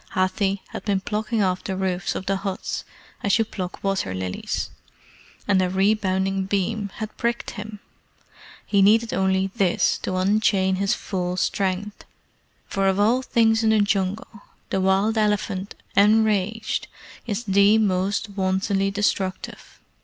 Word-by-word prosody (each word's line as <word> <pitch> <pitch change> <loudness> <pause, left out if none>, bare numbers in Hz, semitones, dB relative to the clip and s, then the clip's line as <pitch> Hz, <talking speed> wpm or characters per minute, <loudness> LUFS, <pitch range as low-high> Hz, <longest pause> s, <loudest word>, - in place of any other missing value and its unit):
Hathi 190 +1 0
had - - -7
been 200 -2 +1
plucking 215 +2 -1
off 185 -1 0
the 190 - -3
roofs 185 -1 -1
of 190 - -4
the 195 +1 0
huts 195 -1 -4 0.4
as 200 +2 +2
you 225 - +2
pluck 185 -4 -6
water 195 - -1
lilies, 95 0 -3 0.8
and 195 -2 +3
a 185 - +1
rebounding 195 -1 +1
beam 200 +2 -1
had 215 -1 -6
pricked 235 0 -2
him. 210 -1 -8 0.9
He 200 -1 +2
needed 225 +3 +4
only 190 0 +1
this 185 -3 +2
to 185 - -3
unchain 190 0 +2
his 195 0 +1
full 180 -2 -3
strength, 195 +2 -1 0.6
for 195 0 0
of 190 +1 +1
all 230 +5 +3
things 225 -3 +2
in 220 - +3
the 220 -1 +4
Jungle 205 +1 -1 0.3
the 190 - +1
wild 195 +4 +2
elephant 210 -2 -1 0.2
enraged 215 +1 +2 0.4
is 215 +1 -2
the 200 +1 +4
most 200 0 0
wantonly 195 0 0
destructive. 195 -2 -2
195 Hz, 140 wpm, -23 LUFS, 190-215 Hz, 0.9 s, needed